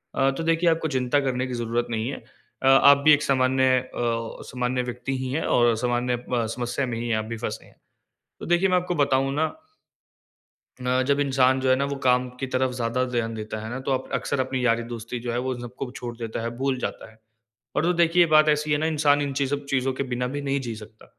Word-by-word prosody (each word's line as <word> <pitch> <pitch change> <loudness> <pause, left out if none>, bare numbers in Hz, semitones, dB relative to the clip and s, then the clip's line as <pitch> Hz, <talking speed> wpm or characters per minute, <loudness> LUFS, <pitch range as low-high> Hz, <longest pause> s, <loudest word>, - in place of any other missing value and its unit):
अ, 135 - +3
तो 135 +4 -4
देखिए 165 +1 +2
आपको 160 -1 +1
चिंता 125 +3 +1
करने 130 -1 -1
की 125 - -5
ज़रूरत 120 0 -1
नहीं 115 0 -2
है। 140 - -4 0.5
अ, - - +3
आप 140 +1 +7
भी 155 - +8
एक 150 0 +2
सामान्य 130 0 +2
अ, 130 - -11 0.6
सामान्य 125 0 -1
व्यक्ति 125 +2 -4
ही 130 0 -4
हैं 160 +4 -1
और 120 -1 +3
सामान्य 120 +1 0 0.2
अ, 120 -2 +1
समस्या 120 +3 -2
में 120 -2 -4
ही 120 - -3
है 115 - +2
आप 110 - -2
भी 115 +1 -5
फँसी - - -5
हैं, - - -21 0.7
तो - - -6
देखिए 175 +3 +3
मैं 185 - +3
आपको 180 0 -1
बताऊँ 135 -3 +2
ना 155 +2 +2 1.3
अ, 125 +1 +1
जब 140 0 +3
इंसान 130 -1 +3
जो 130 - 0
है 130 - +6
ना 140 - 0
वो 140 - -3
काम 125 0 +3
की 135 - -3
तरफ़ 130 0 +1
ज़्यादा 120 +1 -1
ध्यान 115 -2 -1
देता 110 0 -5
है - - -5
ना 125 - -4
तो - - +2
अप 130 0 -2
अक्सर 140 - -1
अपनी 130 -1 -1
यारी-दोस्ती 115 0 -1
जो 120 - -1
है 120 - -1
वो 130 +1 -2
इन 120 - -9
सबको 125 +2 -6
छोड़ 120 -1 -6
देता 115 -1 -5
है, 115 - -2
भूल 135 +1 0
जाता 125 - -5
है। 110 - -22 0.6
और - - +1
तो 175 +2 +2
देखिए 170 +1 +5
बात 155 0 +6
ऐसी 150 0 +1
है 145 - +3
ना 155 - -1
इंसान 145 -2 +2
इन 140 -1 -2
चीज़ 140 0 0
ब 140 0 -9
चीज़ों 135 -1 0
के 135 - -2
बिना 125 0 -1
भी 145 - -3
नहीं 140 0 -1
जी 115 - -4
सकता। 110 +1 -13
130 Hz, 245 wpm, -25 LUFS, 120-140 Hz, 1.3 s, भी